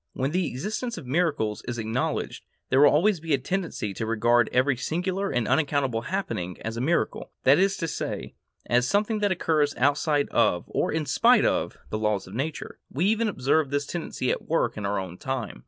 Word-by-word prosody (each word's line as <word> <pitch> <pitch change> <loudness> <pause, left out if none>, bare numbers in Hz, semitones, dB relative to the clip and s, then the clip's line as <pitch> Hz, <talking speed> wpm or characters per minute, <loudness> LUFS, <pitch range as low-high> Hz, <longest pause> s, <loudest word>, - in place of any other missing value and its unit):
When 135 +2 -1
the 180 +2 0
existence 210 - -4
of 165 - -8
miracles 140 -7 0
is 120 -1 -3
acknowledged, 115 +3 -2 0.3
there 130 - +3
will 145 - +8
always 180 +5 +3
be 160 -2 +1
a - - -1
tendency 150 - -3
to 110 - -4
regard 120 +1 +3
every 130 +2 +3
singular 185 +9 -2
and 120 -3 0
unaccountable 140 -6 +1
happening 115 - -3
as 115 0 -4
a 115 - -3
miracle; 165 +6 0
that 135 +5 +6
is 195 0 +2
to 165 - -2
say, 155 - -4 0.3
as 125 +1 +2
something 210 - +1
that 205 -1 +1
occurs 155 -5 +1
outside 145 +2 +2
of, 90 -7 +2
or - - -1
in 155 -1 -1
spite 130 - +4
of, - - 0
the 110 - -2
laws 105 -2 0
of 95 - -12
nature. 145 +7 -4
We 160 +7 -1
even 220 +2 +2
observe 145 -4 +1
this 145 +1 -1
tendency 150 -6 -3
at - - -4
work 165 - +1
in 105 -2 -3
our 100 - -1
own 90 -2 -5
time. 130 - -4
140 Hz, 200 wpm, -26 LUFS, 120-170 Hz, 0.3 s, will